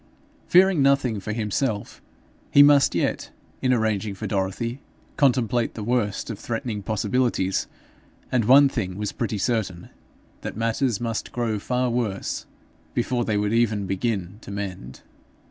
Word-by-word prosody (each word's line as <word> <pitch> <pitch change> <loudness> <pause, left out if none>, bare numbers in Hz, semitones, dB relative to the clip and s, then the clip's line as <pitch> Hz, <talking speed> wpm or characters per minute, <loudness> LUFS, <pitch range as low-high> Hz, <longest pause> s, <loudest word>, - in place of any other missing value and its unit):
Fearing 185 -3 +5
nothing 135 -5 +2
for 105 - -5
himself, 105 0 -2 0.5
he 145 - +8
must 145 -1 +5
yet, - - -1 0.3
in 130 - +2
arranging 110 -4 0
for 110 - -6
Dorothy, 100 +6 -2 0.3
contemplate 125 -5 +2
the 110 - -5
worst 115 -2 -1
of 105 - -7
threatening 115 -2 -3
possibilities; 110 -1 0 0.6
and 120 -4 +2
one 140 +4 +7
thing 100 -9 -3
was 105 -1 -2
pretty 110 -3 -3
certain, 100 -5 -2 0.5
that - - -6
matters 115 0 0
must 115 -2 -3
grow 115 -3 -1
far 125 +3 0
worse 115 -5 -2 0.5
before 120 0 0
they 110 - 0
could 105 +1 0
even 110 -3 +1
begin 95 0 -2
to - - -11
mend. 95 -11 -6
115 Hz, 140 wpm, -24 LUFS, 100-125 Hz, 0.6 s, he